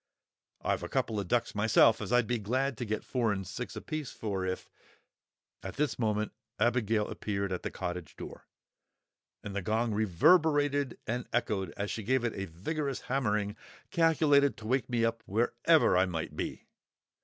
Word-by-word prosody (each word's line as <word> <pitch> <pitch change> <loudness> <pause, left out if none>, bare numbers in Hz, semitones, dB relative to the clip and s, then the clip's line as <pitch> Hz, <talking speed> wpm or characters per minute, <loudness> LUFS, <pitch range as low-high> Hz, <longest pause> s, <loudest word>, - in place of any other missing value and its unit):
I've - - 0
a - - -5
couple 110 -2 0
of 100 - -3
ducks 120 +5 +1
myself 110 +2 +4
as 105 - -4
I'd 120 -1 +4
be 120 +1 -1
glad 130 +6 0
to 120 - -2
get 110 0 -2
four 120 -4 0
and 95 -2 -3
six 120 +6 -6
apiece 155 -4 -4
for 100 -4 -3
if——" 95 0 -3 0.9
At - - -7
this 145 -1 -1
moment 110 -2 0 0.3
Abigail 115 -3 +2
appeared 100 -2 -3
at 90 - -2
the - - -3
cottage 90 -3 -5
door, - - -9 1.0
and 100 -1 -6
the 100 - -1
gong 110 +4 0
reverberated 145 - +3
and 120 +2 -3
echoed 100 -6 0
as 100 0 -2
she 110 - -3
gave 130 +4 +1
it 120 - 0
a 95 - -4
vigorous 135 - -3
hammering, 105 -6 0 0.4
calculated 155 -5 +4
to 110 - -11
wake 130 +2 +1
me 120 -2 +2
up 115 0 -1
wherever 120 - +3
I 95 +1 +4
might 80 -3 -4
be. - - -4
115 Hz, 170 wpm, -31 LUFS, 100-130 Hz, 1.0 s, myself